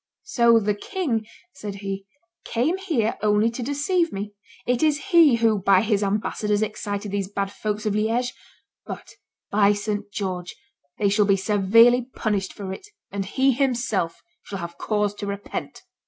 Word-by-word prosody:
"So 235 - +4
the 210 -1 0
king," 230 - -2 0.3
said 210 -7 -6
he, 195 0 -5 0.4
"came 300 +11 0
here 290 - -1
only 210 +2 +3
to 235 - -6
deceive 295 +6 0
me; 205 +1 -5 0.3
it 245 -1 +1
is 310 +5 +1
he 330 -7 +7
who, 225 -2 +2
by 190 0 +5
his 210 -2 +1
ambassadors, 210 +1 0
excited 205 -1 -4
these 200 -1 -2
bad 200 -1 -2
folks 210 +1 -3
of 210 - +1
Liege; 230 +4 0 0.5
but, - - -8 0.4
by 205 0 +4
St. 205 0 -3
George, 185 -3 -4 0.4
they 205 - +2
shall 205 +1 +3
be 195 -1 +3
severely 230 +5 +4
punished 200 -3 -1
for 195 -2 -6
it, 375 - -10 0.2
and 195 -1 -3
he, 265 +7 +2
himself, 235 -9 -1 0.2
shall 195 - -7
have 170 -1 -7
cause 210 -1 0
to 205 0 -6
repent." 200 0 -5
210 Hz, 160 wpm, -24 LUFS, 200-240 Hz, 0.5 s, he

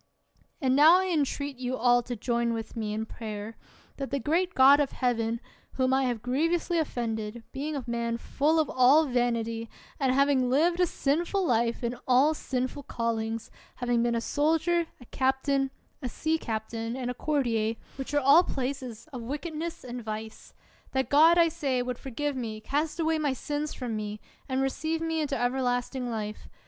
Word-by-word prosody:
And 260 -4 +2
now 310 +5 +8
I 375 0 -1
entreat 285 -4 -1
you 255 0 -3
all 245 0 +4
to 245 +1 -5
join 235 +1 0
with 225 -1 -5
me 215 -2 -2
in 220 +1 -2
prayer, 220 -1 -7 0.4
that 275 -1 -4
the 280 - -1
great 340 +7 0
God 275 +2 +7
of 285 -2 0
Heaven, 230 -2 0 0.3
whom 260 0 +1
I 265 0 +3
have 240 -3 -2
grievously 330 +7 +1
offended, 230 -5 -3
being 295 +3 -3
a 275 - -3
man 235 -1 -1
full 300 +6 +1
of 310 - +2
all 260 +6 +5
vanity, 230 -3 -1 0.3
and 265 -3 +2
having 270 -1 +3
lived 335 +7 +3
a 360 - +4
sinful 340 +7 0
life, 235 -3 +1
in 235 +1 -1
all 265 +5 +5
sin 255 -4 -2
ful 285 - -9
callings, 230 -3 -3 0.2
having 245 -1 0
been 235 0 +1
a 230 - 0
soldier, 325 +5 +1
a 245 - -13
captain, 265 +2 +1 0.3
a 250 - -3
sea 320 +6 -1
captain, 225 0 -4
and 250 -1 -3
a - - -4
courtier, 235 -6 0 0.2
which 270 0 -5
are 290 - +4
all 285 +6 +7
places 255 -5 -4
of 250 - -5
wickedness 310 +6 -5
and 245 -1 -6
vice; 220 0 -7 0.4
that 265 0 0
God, 320 +4 +6
I 340 -1 +6
say, 280 -6 -1
would 245 -1 -4
forgive 280 +2 -3
me, 225 -4 -4
cast 295 +8 -2
away 320 -1 +1
my 290 -3 +1
sins 295 +2 -3
from 245 -4 -4
me, 210 0 -4 0.3
and 260 0 +1
re 270 - +2
ceive 320 +4 -2
me 325 -1 -1
into 285 -2 -1
everlasting 245 0 -1
life. 215 -2 -5
260 Hz, 180 wpm, -28 LUFS, 235-295 Hz, 0.4 s, now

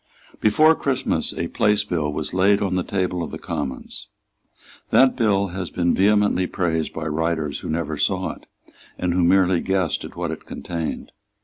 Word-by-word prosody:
Before 155 +10 +5
Christmas 140 -5 -1
a - - -3
Place 105 0 +2
Bill 80 -7 -1
was 75 - -4
laid 100 +2 +4
on 100 -2 -1
the 90 - +1
table 90 -1 -2
of 85 - -4
the - - -6
Commons. 65 - -5 0.8
That 130 0 +5
bill 100 -5 +2
has 90 -1 -5
been 85 +1 +1
vehemently 100 -2 +3
praised 80 -4 -1
by 80 - -5
writers 80 -1 -1
who - - -7
never 80 -1 -2
saw - - 0
it, - - -14 0.5
and 90 -1 -1
who 90 0 +2
merely 90 0 +4
guessed 95 -4 0
at - - -9
what - - -3
it - - -8
contained. 85 -2 -5
90 Hz, 175 wpm, -22 LUFS, 80-100 Hz, 0.8 s, Before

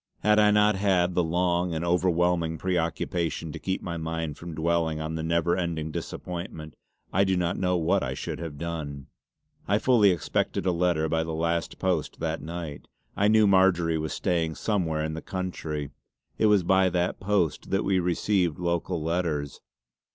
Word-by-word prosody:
Had 105 +1 +5
I 105 0 +6
not 105 0 +4
had 95 -2 +2
the 90 - +2
long 90 +1 0
and 80 +2 -2
overwhelming 85 -1 +1
preoccupation 85 -2 -1
to - - -7
keep 95 0 -3
my 85 -1 -4
mind 80 -2 -3
from 85 0 -8
dwelling 80 -1 0
on 80 +1 -4
the 80 - -3
never 85 +1 +1
ending 85 -3 -2
disappointment, 85 -2 -6 0.4
I 95 - +4
do 95 -1 +1
not 90 -1 0
know 90 -1 +1
what 90 +4 +2
I 65 -1 -3
should - - -5
have 80 -4 -6
done. 75 -4 -5 0.6
I 105 - +3
fully 110 -3 +4
expected 90 +1 -1
a 90 - +3
letter 85 -2 +1
by 80 +1 0
the 80 0 -4
last 85 +1 -1
post 90 -5 -1
that 80 0 -2
night. 80 -2 -6 0.3
I 100 - +2
knew 110 0 +5
Marjory 95 -4 +3
was 80 0 -3
staying 85 -3 0
somewhere 85 -8 -1
in 80 0 -2
the 80 - -5
County; 80 -6 -4 0.5
it 110 - +4
was 105 -3 +4
by 95 +1 +4
that 90 0 -1
post 100 -4 0
that 95 - +1
we 95 -1 +2
received 90 -1 +1
local 85 -1 -1
letters. 80 -5 -2
85 Hz, 175 wpm, -27 LUFS, 80-95 Hz, 0.6 s, I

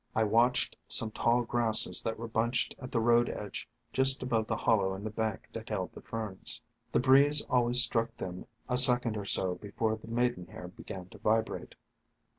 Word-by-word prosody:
I 110 - +3
watched 115 +4 +2
some 110 -1 +1
tall 120 +3 +1
Grasses 115 -1 +3
that 115 - -3
were 115 +1 -6
bunched 115 +2 0
at 130 - -8
the 115 - +1
road 120 +1 +3
edge - - -6 0.2
just 130 0 +2
above 115 -3 0
the 110 - -1
hollow 100 -5 +1
in 95 - -8
the 110 - -4
bank 110 -1 -3
that - - -7
held - - -3
the - - -11
Ferns. 110 -4 -3 0.3
The - - +2
breeze 145 +3 +5
always 125 0 +3
struck 115 -1 -1
them 90 0 -7 0.2
a 125 - 0
second 125 -2 +5
or 100 -2 -4
so 95 -2 0
before 110 +3 -2
the 110 - -14
Maidenhair 115 -7 -3
began 90 0 -9
to - - -14
vibrate. 110 +1 -1
115 Hz, 185 wpm, -30 LUFS, 110-120 Hz, 0.3 s, breeze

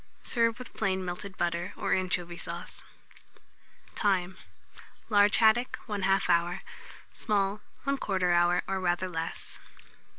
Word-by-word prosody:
Serve 230 -1 +2
with 250 -1 -10
plain 190 -3 -1
melted 180 +2 -6
butter, 175 0 -1
or - - 0
anchovy 180 -2 -1
sauce. - - -5 1.1
Time. 190 -3 +1 0.7
Large 205 -1 +5
haddock, 230 +2 +4
1/2 195 -2 +1
hour; 175 0 +1 0.5
small, 205 -1 0 0.2
1/4 195 -10 +1
hour, 175 +1 +3
or 195 0 -1
rather 180 0 0
less. 165 -2 -5
190 Hz, 110 wpm, -29 LUFS, 175-205 Hz, 1.1 s, Large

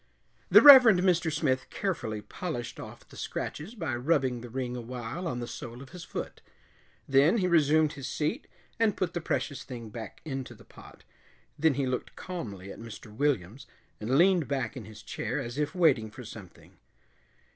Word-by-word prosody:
The - - +8
Reverend 255 -10 +10
Mr. 175 -3 +2
Smith 140 -4 0
carefully 115 - -3
polished 120 -10 -5
off - - -10
the - - -16
scratches 175 +11 -5
by 160 - -2
rubbing 130 -2 +1
the 120 - -9
ring 125 0 -3
awhile 125 +8 -5
on 125 -6 -3
the 120 - -3
sole 120 +1 -8
of 135 0 -11
his 180 -1 -9
foot. - - -6 0.7
Then 140 +9 +4
he 190 - +1
resumed 155 -3 +3
his 135 -2 -6
seat 155 - -2 0.3
and 225 -2 +2
put 180 -2 -1
the 175 - -3
precious 145 -3 -2
thing 115 -4 -8
back 110 -2 -8
into 135 -4 -5
the - - -17
pot. - - -15 0.6
Then 155 -2 +3
he 140 0 0
looked 125 -1 -3
calmly 100 - -7
at - - -10
Mr. 115 -1 -10
Williams, 130 -2 -1 0.3
and 120 +5 +1
leaned 175 -3 +4
back 135 -1 -2
in 125 -5 -7
his 105 0 -12
chair - - -3
as 120 +4 -5
if 150 +4 -1
waiting 140 -11 +3
for 125 +4 -10
something. 105 -4 -13
135 Hz, 180 wpm, -29 LUFS, 120-165 Hz, 0.7 s, Reverend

